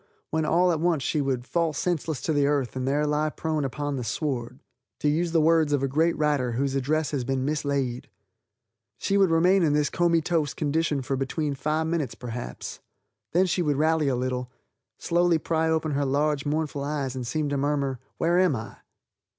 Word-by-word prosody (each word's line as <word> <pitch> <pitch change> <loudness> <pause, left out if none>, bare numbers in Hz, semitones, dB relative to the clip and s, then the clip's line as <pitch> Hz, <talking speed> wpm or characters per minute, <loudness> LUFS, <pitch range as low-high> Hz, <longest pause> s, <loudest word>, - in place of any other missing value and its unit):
when 160 0 0
all 180 +3 +3
at 160 - 0
once 165 -4 +1
she 150 - 0
would 130 -3 -1
"fall 165 +1 0
senseless 160 -1 -2
to 160 - 0
the 145 -1 +3
earth 140 -4 0
and 130 0 -2
there 145 +2 +1
lie 150 +1 +1
prone 155 -1 -2
upon 145 +1 -3
the 125 - -3
sward," 125 0 -3 0.4
to - - 0
use 165 +3 +1
the 165 - +3
words 160 -1 +3
of 140 -1 +1
a - - +2
great 160 +5 +1
writer 145 -5 +1
whose 135 +3 0
address 145 +3 0
has 140 -4 -1
been 130 +1 -1
mislaid. 140 -4 -1 0.9
She 195 - -1
would 195 -2 +4
remain 180 +4 +4
in 155 -4 +3
this 150 -1 +1
comytoes 165 -3 +1
condition 150 -2 0
for 135 +2 -1
between 140 +3 -2
five 155 +3 -1
minutes, 160 -6 -2
perhaps. 120 - -6 0.5
Then 180 +3 +4
she 180 0 0
would 150 -4 +1
rally 155 0 +2
a 135 - +2
little, 125 0 -2 0.5
slowly 175 0 +2
pry 160 +1 0
open 160 -1 0
her 145 0 0
large, 145 +1 0
mournful 150 -2 -1
eyes, 140 -3 -2
and 125 -2 -4
seem 155 +3 -1
to 140 - -1
murmur 140 -2 0 0.2
"Where 175 +2 +2
am 185 -6 +3
I?" 110 -2 -7
150 Hz, 195 wpm, -26 LUFS, 135-160 Hz, 0.9 s, would